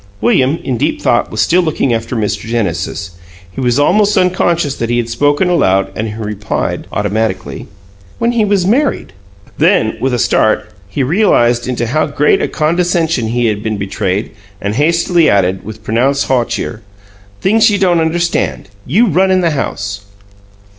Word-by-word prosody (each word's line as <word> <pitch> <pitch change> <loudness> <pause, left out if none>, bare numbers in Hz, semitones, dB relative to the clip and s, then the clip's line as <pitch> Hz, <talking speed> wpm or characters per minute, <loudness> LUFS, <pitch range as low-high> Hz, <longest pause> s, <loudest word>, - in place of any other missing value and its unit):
William, 130 +7 +2
in 130 -3 -2
deep - - -1
thought, - - +1
was - - -2
still 180 +2 +3
looking 155 -6 0
after 115 +2 -3
Mr. 105 -3 -1
Genesis; 95 -4 -2 0.4
he 95 - -6
was 125 -1 +1
almost 205 +8 +3
unconscious 175 -5 +1
that 115 - -3
he 120 - +1
had 120 -1 -1
spoken 145 +9 +1
aloud 100 - +2
and 110 - -3
he 105 - -6
replied, 105 -2 -3
automatically: 105 -1 -2 0.5
"When 235 +1 +1
he 235 -2 +1
was 200 -3 +1
married." 245 - 0 0.5
Then, - - +2
with 130 - +1
a 125 - 0
start, 110 -1 +1 0.2
he 115 +7 -1
realized 125 - +2
into 120 -2 -2
how 155 +7 0
great 150 0 +2
a - - 0
condescension 165 -5 0
he 120 +2 0
had 105 -2 0
been 110 -1 -2
betrayed, 100 +1 -2 0.3
and 100 +1 -2
hastily 170 +5 +2
added, 95 -2 +1
with 110 +1 -9
pronounced 130 +6 +1
hauteur, 120 -3 -1 0.6
"Things 220 +3 +4
you 205 - +1
don't 180 -3 +2
understand. 170 - -1 0.2
You 200 - +3
run 190 -2 +2
in 185 0 +3
the 170 -2 +1
house." 100 -8 -4
130 Hz, 165 wpm, -14 LUFS, 110-175 Hz, 0.6 s, Things